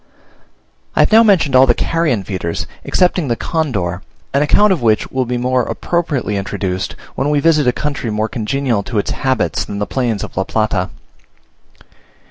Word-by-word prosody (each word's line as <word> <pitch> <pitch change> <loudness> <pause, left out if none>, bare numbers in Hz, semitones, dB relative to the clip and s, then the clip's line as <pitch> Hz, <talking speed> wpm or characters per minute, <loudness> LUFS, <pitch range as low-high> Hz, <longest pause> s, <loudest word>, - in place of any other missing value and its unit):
I - - +4
have - - +3
now 220 +1 +8
mentioned 190 - +3
all 130 +1 +7
the 120 - +4
carrion 155 - 0
feeders, 90 -4 -3 0.2
excepting 180 -3 +1
the 120 - +1
condor, 100 - -2 0.3
an 140 - +3
account 200 +7 +4
of 175 - -3
which 110 -2 +1
will 130 -1 0
be 125 +1 -2
more 125 +1 +1
appropriately 145 -6 -2
introduced 95 -2 -3 0.2
when 140 - -1
we 150 -1 +2
visit 150 -3 +3
a - - +5
country 140 -2 -3
more 110 +1 -1
congenial 120 0 -1
to 110 +3 -5
its 100 - 0
habits 130 - 0
than 100 - -6
the 105 - -1
plains 115 -4 -1
of - - -8
La 95 - +1
Plata. 105 -4 -1
125 Hz, 175 wpm, -17 LUFS, 105-150 Hz, 0.3 s, now